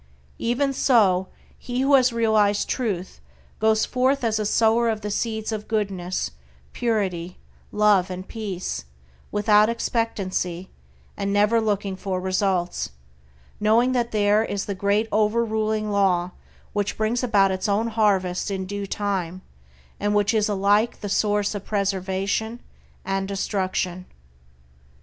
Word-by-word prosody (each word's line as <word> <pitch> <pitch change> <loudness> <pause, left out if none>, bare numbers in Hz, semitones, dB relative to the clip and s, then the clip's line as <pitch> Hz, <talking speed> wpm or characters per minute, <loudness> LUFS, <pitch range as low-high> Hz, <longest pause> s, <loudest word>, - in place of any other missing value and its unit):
Even 260 +4 0
so, 195 -9 +3 0.3
he 245 +1 -3
who 275 +2 +2
has 260 -2 +5
realized 215 -3 +2
Truth 200 -8 -3 0.4
goes 220 0 +3
forth 260 +1 +1
as 220 -2 +1
a 210 - 0
sower 230 +2 +3
of 220 -1 -2
the 210 0 -4
seeds 220 +1 -2
of 215 -1 -4
goodness, 190 - -2 0.4
purity, 190 -7 -1 0.3
love 210 -3 +3
and 185 +1 -6
peace, 200 - -5 0.5
without 210 +1 +4
expectancy, 195 -6 -2 0.4
and 200 0 -2
never 210 +3 +3
looking 205 -3 -1
for 190 -1 -3
results, 185 -1 -1 0.7
knowing 225 +4 +3
that 240 -2 0
there 210 0 +3
is 200 -3 -3
the 200 - -3
Great 200 +3 +1
Over 215 +2 +2
ruling 215 -1 -1
Law 185 -3 +2 0.4
which 205 -1 -1
brings 220 +3 0
about 200 -5 +3
its 190 +2 -2
own 215 +3 +1
harvest 200 -5 +1
in 190 -1 -3
due 200 +1 -5
time, 185 -3 -3 0.6
and 205 0 0
which 205 +1 +2
is 215 -1 +2
alike 205 +3 +2
the 205 - -4
source 205 0 +1
of 205 -2 -5
preservation 200 +3 -1 0.5
and 195 0 -1
destruction. 185 -2 -2
205 Hz, 135 wpm, -24 LUFS, 190-220 Hz, 0.7 s, has